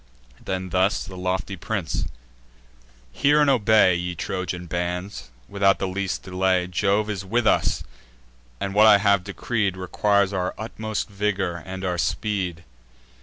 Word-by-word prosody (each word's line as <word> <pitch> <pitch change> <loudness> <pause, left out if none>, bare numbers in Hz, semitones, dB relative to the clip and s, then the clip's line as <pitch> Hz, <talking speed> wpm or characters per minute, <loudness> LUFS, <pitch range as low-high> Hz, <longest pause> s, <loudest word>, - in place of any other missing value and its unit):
Then 95 0 -3
thus 95 +1 +2
the 95 - -10
lofty 95 +2 -2
prince: 95 -2 -3 1.1
"Hear 145 +1 +3
and 145 -2 +5
obey, 110 -6 +5
Ye 90 0 -3
Trojan 90 0 -4
bands, 90 -5 -4 0.2
without 100 -1 +2
the 95 - -2
least 95 0 -3
delay 95 -1 +1
Jove 100 +4 +1
is 100 -3 -3
with 115 +5 0
us; - - +2 0.8
and 100 - -3
what 105 +2 +6
I 105 -2 +8
have 100 -2 +3
decreed 100 0 -2
Requires 100 +1 +1
our 90 -1 -2
utmost 110 0 -4
vigour, 100 -4 -2
and 95 0 -5
our 90 -1 -1
speed. 90 -2 -2
95 Hz, 140 wpm, -24 LUFS, 90-105 Hz, 1.1 s, I